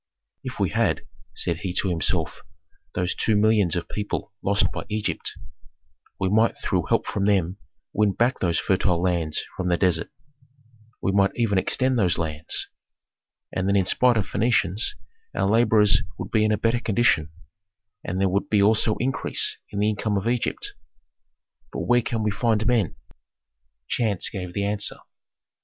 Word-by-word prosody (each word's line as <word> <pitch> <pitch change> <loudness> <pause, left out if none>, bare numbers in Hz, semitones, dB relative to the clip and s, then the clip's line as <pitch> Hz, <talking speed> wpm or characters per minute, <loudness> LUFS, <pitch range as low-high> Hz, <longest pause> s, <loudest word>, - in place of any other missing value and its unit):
"If - - -6
we - - +1
had," - - 0 0.3
said 85 - 0
he 95 -1 -4
to 95 - +1
himself, 85 -3 -1 0.5
"those 90 0 0
two 110 - +1
millions 105 -4 +3
of 85 - -3
people 105 0 -4
lost 100 +1 +2
by - - -5
Egypt, 105 0 -2 0.9
we 95 - +1
might 110 +4 +3
through - - -1
help - - +2
from 100 - -1
them 95 -3 +1 0.4
win 105 -2 +2
back 120 +5 +1
those 85 -3 +1
fertile 95 -2 +1
lands 85 -4 0
from 95 - -3
the 85 - +2
desert, 85 -3 +1 0.9
we 95 - +2
might 100 0 +3
even 105 -5 +2
extend 130 +5 +2
those 90 -6 +2
lands. 80 -1 -2 0.9
And 90 - -1
then 100 - +2
in 95 -2 +3
spite 125 +5 +3
of 105 - +1
Phœnicians 105 -2 +1 0.4
our - - +1
laborers 110 -2 +4 0.2
would - - -6
be 110 - +3
in 110 - +2
a 105 - +2
better 115 +3 +1
condition, 110 - +2 0.7
and 90 +2 -3
there 95 - +3
would 95 +2 -1
be 105 - +3
also 110 +1 +3
increase 135 +3 0
in 100 - -7
the 105 +1 +2
income 105 0 -1
of 100 +3 -2
Egypt. 120 0 -1 1.0
But - - -4
where 120 0 +3
can 115 -1 -2
we 105 - +1
find 110 +1 +1
men?" 115 -7 +1 0.9
Chance 105 -6 0
gave 90 -3 -6
the 100 - 0
answer. 105 0 +1
100 Hz, 165 wpm, -24 LUFS, 95-110 Hz, 1.0 s, laborers